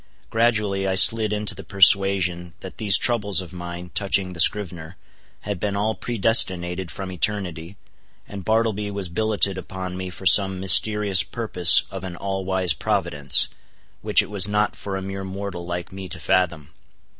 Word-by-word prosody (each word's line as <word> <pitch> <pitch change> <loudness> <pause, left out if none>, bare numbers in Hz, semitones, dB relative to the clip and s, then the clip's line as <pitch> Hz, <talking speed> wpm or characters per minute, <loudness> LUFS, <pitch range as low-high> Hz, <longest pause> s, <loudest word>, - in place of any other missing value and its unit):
Gradually 110 -4 -1
I 95 - -1
slid 110 +2 +6
into 105 0 -2
the - - -11
persuasion 95 -3 +2
that 95 - -11
these 105 -3 +5
troubles 105 -5 0
of 90 -2 -8
mine 90 0 -9
touching 95 -2 0
the 85 - -11
scrivener, 90 -3 0 0.4
had 100 -3 -6
been 100 +2 -3
all 105 +2 -1
predestinated 95 -6 +1
from 95 +1 -8
eternity, 90 -2 -4 0.5
and 100 -2 -9
Bartleby 110 0 -1
was 100 -3 -6
billeted 100 0 -1
upon 95 0 -8
me 95 0 -6
for 90 +2 -12
some 95 0 +5
mysterious 100 0 +4
purpose 95 -6 +2
of 95 -2 -8
an 90 -2 -7
all 95 +1 -5
wise 95 -2 +1
Providence, 70 -1 +1 0.5
which - - +3
it - - -12
was 100 -2 0
not 105 0 -1
for 100 -1 -7
a 95 - -7
mere 95 0 -7
mortal 95 -2 -7
like 85 0 -6
me 95 -1 -9
to - - -3
fathom. 85 -5 -2
95 Hz, 165 wpm, -21 LUFS, 90-105 Hz, 0.5 s, slid